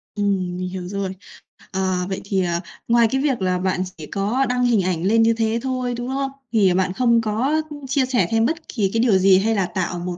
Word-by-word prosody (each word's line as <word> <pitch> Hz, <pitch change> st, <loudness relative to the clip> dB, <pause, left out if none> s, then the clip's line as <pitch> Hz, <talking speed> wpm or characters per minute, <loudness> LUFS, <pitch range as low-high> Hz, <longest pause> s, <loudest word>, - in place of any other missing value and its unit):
Ừm, 190 Hz, -3 st, -1 dB
mình 185 Hz, 0 st, -3 dB
hiểu 180 Hz, -1 st, -6 dB
rồi. 195 Hz, -1 st, -3 dB, 0.6 s
Ờ, 185 Hz, -1 st, -1 dB
vậy 190 Hz, -, -3 dB
thì, 195 Hz, -2 st, 0 dB
ờ, 170 Hz, -1 st, -1 dB, 0.3 s
ngoài 235 Hz, -1 st, +4 dB
cái 265 Hz, 0 st, +1 dB
việc 265 Hz, -8 st, 0 dB
là 185 Hz, -1 st, +1 dB
bạn 185 Hz, 0 st, 0 dB
chỉ 155 Hz, -, -8 dB
có 215 Hz, +7 st, 0 dB
đăng 250 Hz, 0 st, +1 dB
hình 230 Hz, -5 st, +3 dB
ảnh 175 Hz, -2 st, -1 dB
lên 225 Hz, +4 st, +3 dB
như 230 Hz, 0 st, +4 dB
thế 225 Hz, 0 st, 0 dB
thôi, 255 Hz, -2 st, -2 dB
đúng 240 Hz, +1 st, -4 dB
không? 270 Hz, 0 st, -2 dB, 0.2 s
Thì 195 Hz, -5 st, +4 dB
bạn 185 Hz, 0 st, 0 dB
không 235 Hz, 0 st, +3 dB
có 250 Hz, +9 st, 0 dB, 0.3 s
chia 270 Hz, 0 st, +1 dB
sẻ 240 Hz, -9 st, +1 dB
thêm 225 Hz, 0 st, +3 dB
bất 320 Hz, +3 st, -3 dB
kỳ 205 Hz, -6 st, 0 dB
cái 225 Hz, -, +1 dB
điều 225 Hz, -5 st, +4 dB
gì, 190 Hz, 0 st, +5 dB
hay 220 Hz, +2 st, +1 dB
là 195 Hz, -2 st, +1 dB
tạo 175 Hz, 0 st, -3 dB
một 175 Hz, 0 st, -4 dB
205 Hz, 235 wpm, -21 LUFS, 185-240 Hz, 0.6 s, gì